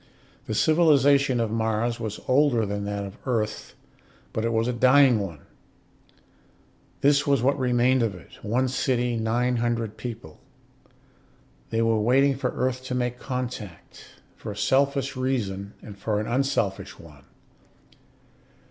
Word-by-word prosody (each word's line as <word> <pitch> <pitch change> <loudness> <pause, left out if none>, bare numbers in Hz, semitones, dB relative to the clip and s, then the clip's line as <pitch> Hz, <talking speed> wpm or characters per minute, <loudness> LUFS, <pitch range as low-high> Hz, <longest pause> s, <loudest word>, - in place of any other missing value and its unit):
The 110 - -2
civilization 140 -3 +4
of 115 -2 -1
Mars 110 +1 -1
was 110 -2 -5
older 130 -4 +3
than 100 0 -3
that 100 0 -3
of 100 0 -10
Earth, 110 -4 -2 0.6
but 110 - -2
it 115 - 0
was 115 +1 +1
a 125 - 0
dying 130 0 +5
one. 85 -8 -6 1.6
This 140 0 +3
was 140 -4 +2
what 140 +2 +2
remained 125 0 +2
of 110 -5 -1
it: 90 - -14
one 120 +5 0
city, 125 -1 0
nine 120 +2 0
hundred 115 -2 -2
people. 115 -10 -8 1.3
They 115 0 0
were 115 -1 +2
waiting 135 +5 +3
for 130 -1 -2
Earth 130 0 -2
to 130 - -3
make 125 0 -2
contact, 125 - -7 0.2
for - - -7
a 100 - -9
selfish 135 +5 +1
reason 105 -7 -3
and 105 - -10
for 105 +1 -2
an 105 - -3
unselfish 120 -6 -1
one. 75 -4 -16
120 Hz, 140 wpm, -25 LUFS, 110-130 Hz, 1.6 s, dying